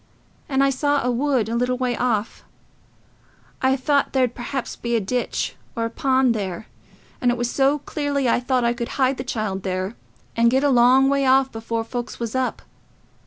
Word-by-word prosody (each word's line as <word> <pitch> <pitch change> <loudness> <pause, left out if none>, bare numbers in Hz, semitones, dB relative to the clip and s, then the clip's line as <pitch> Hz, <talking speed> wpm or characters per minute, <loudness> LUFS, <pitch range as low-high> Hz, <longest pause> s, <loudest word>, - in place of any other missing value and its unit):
And 270 -1 +2
I 275 - +3
saw 285 +1 +1
a 250 - +2
wood 255 -2 +1
a 230 - -2
little 250 +1 0
way 250 -1 -1
off... 230 -4 -1 1.2
I 260 0 +3
thought 280 +1 +1
there'd 255 -3 +2
perhaps 255 +2 -4
be 235 0 -2
a - - +3
ditch 245 +5 -2 0.2
or 230 -1 -1
a 230 - -4
pond 260 -1 +2
there... 195 -2 -4 0.6
and 250 - +3
it 240 - +1
was 240 0 -1
so 275 +2 +2 0.2
early 285 -3 0
I 235 - +3
thought 250 0 0
I 235 - +2
could 240 -1 -5
hide 265 -1 +2
the 255 - -4
child 215 -6 -3
there, 185 +3 -3 0.4
and 235 0 +4
get 265 +3 +2
a 290 - +4
long 255 +1 +5
way 275 -1 +2
off 265 0 +4
before 225 0 -3
folks 240 +1 -6
was 230 -2 -4
up. 260 -1 -2
250 Hz, 195 wpm, -22 LUFS, 235-270 Hz, 1.2 s, long